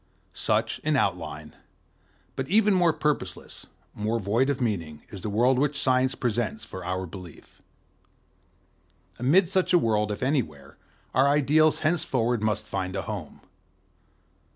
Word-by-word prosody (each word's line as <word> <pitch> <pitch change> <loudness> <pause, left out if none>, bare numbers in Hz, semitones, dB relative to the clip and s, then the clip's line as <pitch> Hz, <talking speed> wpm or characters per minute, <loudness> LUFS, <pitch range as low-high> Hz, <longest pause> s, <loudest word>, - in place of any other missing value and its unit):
'"Such, - - 0
in - - 0
outline, 75 0 -2 0.8
but 130 - -3
even 210 +2 +4
more 175 -3 +4
purposeless, 150 -1 -3 0.3
more 110 +2 -1
void 115 +7 +1
of 140 -1 -1
meaning, 85 - -3
is 100 - -8
the 105 - -4
world 125 +5 +3
which 145 0 +1
Science 130 -1 +2
presents 120 - -2
for 95 - -8
our 95 +1 -3
belief. 90 -1 -12 1.6
Amid 165 +10 +4
such 185 0 +1
a - - +8
world, 105 - +1
if 105 - -4
anywhere, 120 - -2 0.4
our 130 +2 +4
ideals 150 +2 +3
henceforward 125 -8 +1
must 110 0 -1
find 95 -3 -3
a - - -2
home. - - -7
125 Hz, 135 wpm, -26 LUFS, 105-150 Hz, 1.6 s, a